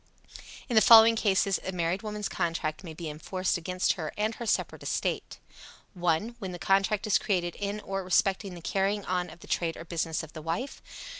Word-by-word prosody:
In 245 - -3
the 220 - +7
following 225 +1 +9
cases 195 -3 +2
a 190 - -3
married 175 +1 -1
woman's 210 -1 -4
contract 165 -2 -2
may 160 -3 -8
be 165 0 -6
enforced 180 +5 -2
against 180 +2 0
her 160 -4 -5
and 215 +2 0
her 235 0 -6
separate - - 0
estate: - - -2 0.6
1. 180 +6 0
When 190 -4 -5
the - - -5
contract 195 +3 +1
is 215 - +3
created 175 -4 -1
in 205 +1 -3
or 195 -1 -3
respecting 190 +1 +1
the 170 - -10
carrying 195 +2 0
on 180 -1 -1
of 170 - -13
the - - -13
trade 165 -2 -1
or - - -8
business 165 -2 -2
of 160 - -11
the 155 - -7
wife. 170 - -4
185 Hz, 200 wpm, -28 LUFS, 170-210 Hz, 0.6 s, following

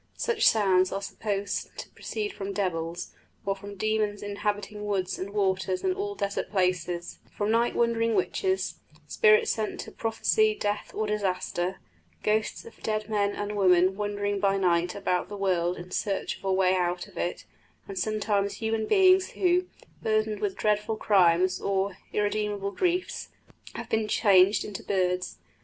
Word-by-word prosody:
Such 460 -2 +2
sounds 190 -4 +4
are 195 - -2
supposed 200 0 -3
to - - -6
proceed 420 -2 -4
from 200 0 -5
devils, 175 -4 -2 0.3
or 195 0 0
from 200 +1 -9
demons 215 0 -1
inhabiting 205 0 -3
woods 195 -3 -1
and 190 - -4
waters 190 -2 0
and 375 - +2
all 405 +1 -4
desert 200 - -2
places; 180 -3 -1 0.2
from 205 +1 0
night 235 +1 +2
wandering 230 -1 +2
witches; 380 -1 0 0.3
spirits 445 0 +4
sent 215 -1 -3
to - - -9
prophesy 430 - +1
death 205 - -2
or 215 - 0
disaster; 190 -3 -1 0.5
ghosts 215 0 0
of 230 - -14
dead 215 0 -2
men 205 -1 +1
and 205 0 -3
women 185 -1 +4
wandering 205 0 -2
by 195 0 +2
night 175 -2 +1
about 180 -3 -1
the 205 - -6
world 180 -2 +1
in 175 +1 -9
search 195 0 -1
of - - -18
a 190 - +1
way 185 -1 +3
out 180 -1 -1
of 200 - -18
it; 175 +1 -3 0.4
and 195 -2 -5
sometimes 205 -1 0
human 220 -1 -1
beings 375 -1 +5
who, 360 0 +2 0.3
burdened 215 -1 0
with 205 -2 -2
dreadful 210 +1 +1
crimes 185 -2 +3
or 195 -1 0 0.2
irremediable 205 -1 -1
griefs, 360 - -1 0.5
have - - -6
been 220 -1 +1
changed 200 -2 +4
into 205 -2 -6
birds. 180 -2 -1
205 Hz, 155 wpm, -27 LUFS, 190-215 Hz, 0.5 s, beings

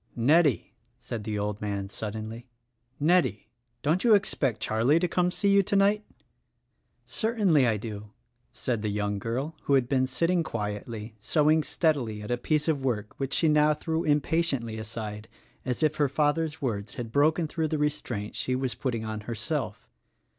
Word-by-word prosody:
"Nettie," 145 +3 +3 0.2
said 120 -3 -6
the 105 -1 -2
old 105 0 -3
man 100 -2 -2
suddenly, 110 +3 -6 0.5
"Nettie, 160 - +2 0.3
don't 160 +5 +2
you 230 -3 +7
expect 135 - 0
Charlie 115 +8 +2
to 180 +1 +2
come 180 +1 +1
to 180 - -6
see 200 - +2
you 200 0 +6
tonight?" 200 +2 +2 1.0
"Certainly 200 - +2
I 110 -2 +2
do," 105 -1 -7 0.4
said 120 -1 -2
the 105 - -1
young 105 0 -1
girl 130 +9 -3
who 140 - +4
had 130 -3 +2
been 130 -1 +2
sit 130 +5 0
ting 175 0 +2
quietly, 105 -3 -4
sewing 155 +7 +3
steadily 130 -11 0
at 105 - -5
a 120 - +1
piece 150 +4 0
of 145 -4 0
work 110 -5 -2
which 135 0 -1
she 165 - +3
now 150 0 +4
threw 160 +2 -2
impatiently 145 -7 0
aside 110 -1 -6 0.4
as 130 +4 -1
if 155 0 +2
her 145 -2 +2
father's 150 +2 0
words 105 -5 -3
had 115 -2 -5
broken 155 +5 +3
through 160 +1 -1
the 155 - -1
restraint 145 -8 -2
she 130 - -1
was 130 -1 -1
putting 115 -4 -3
on 110 -1 -4
herself. 115 -1 -3
130 Hz, 170 wpm, -27 LUFS, 110-155 Hz, 1.0 s, you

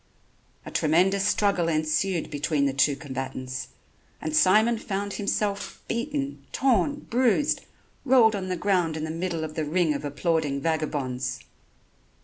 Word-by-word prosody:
A - - -7
tremendous 190 +6 +2
struggle 200 -5 +2
ensued 160 +3 0
between 145 0 0
the 140 - +1
two 140 +1 +3
combatants, 130 -2 -5 0.5
and 155 0 -3
Simon 215 +7 +4
found 200 -2 -3
himself 200 0 -2
beaten, 275 +4 -3
torn, 270 +3 +1
bruised, 250 +4 +1 0.4
rolled 245 -5 +5
on 190 -2 -4
the 185 - 0
ground 175 -4 +1
in 155 - -4
the 155 - -3
middle 165 -1 -3
of 155 -1 -5
the 155 - -2
ring 160 +1 +1
of 145 - -4
applauding 145 0 0
vagabonds. 140 -5 -2
165 Hz, 135 wpm, -26 LUFS, 150-205 Hz, 0.5 s, rolled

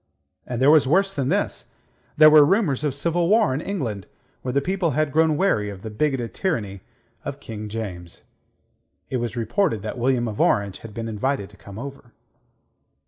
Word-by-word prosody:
And 120 -1 -3
there 135 +3 +6
was 155 -4 +5
worse 195 +6 +2
than 135 -2 -1
this: - - -1 0.5
there 155 0 +8
were 150 -1 +8
rumours 150 - +2
of 145 -3 0
civil 170 +3 0
war 215 -8 +4
in 140 - -2
England, 120 - -4 0.3
where 125 - -3
the 140 - +2
people 180 +2 -1
had 155 -2 +1
grown 160 +1 +3
weary 110 - +1
of 100 -2 -9
the 110 - -6
bigoted 130 0 -1
tyranny 105 - -2 0.4
of - - -6
King 105 -1 -7
James. 90 -6 -7 0.9
It 130 - 0
was 120 -1 -3
reported 115 - 0
that 110 +3 -5
William 120 -1 +1
of 105 -2 -3
Orange 100 -2 +1
had 110 -2 -11
been 115 -1 -4
invited 110 0 -2
to - - -17
come 100 0 -12
over. 135 -1 -9
130 Hz, 185 wpm, -23 LUFS, 110-155 Hz, 0.9 s, there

